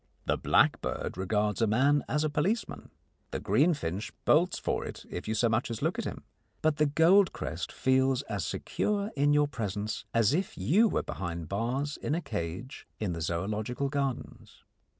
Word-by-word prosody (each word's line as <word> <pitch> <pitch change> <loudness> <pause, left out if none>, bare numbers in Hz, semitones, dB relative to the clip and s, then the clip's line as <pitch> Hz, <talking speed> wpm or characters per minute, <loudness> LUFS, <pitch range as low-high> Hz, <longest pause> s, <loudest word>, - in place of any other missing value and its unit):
The - - +2
blackbird - - +1
regards 105 +3 0
a 115 - +4
man 140 +7 +3
as 150 0 +1
a 155 - +1
policeman; 190 +11 -1 0.4
the - - -3
greenfinch 110 - +1
bolts 175 +4 +4
for - - -1
it - - -8
if 90 - -5
you 110 - -1
so 115 +2 +3
much 115 +3 0
as 115 - -4
look - - 0
at - - -2
him, - - -5 0.4
but 155 -1 +2
the 150 - +3
goldcrest 170 +6 +2
feels 130 0 +2
as 100 -5 -3
secure 205 - -1
in 145 +1 +3
your 145 0 +4
presence 105 -5 -4
as 115 +1 +3
if 185 +4 -1
you 180 - +4
were - - 0
behind 85 -3 -5
bars 125 +8 -1
in 150 - -1
a 170 - -1
cage 90 - -5
in 100 -5 -1
the 85 - -5
Zoological 105 - -2
Gardens. 140 -3 -4
130 Hz, 170 wpm, -29 LUFS, 105-150 Hz, 0.4 s, a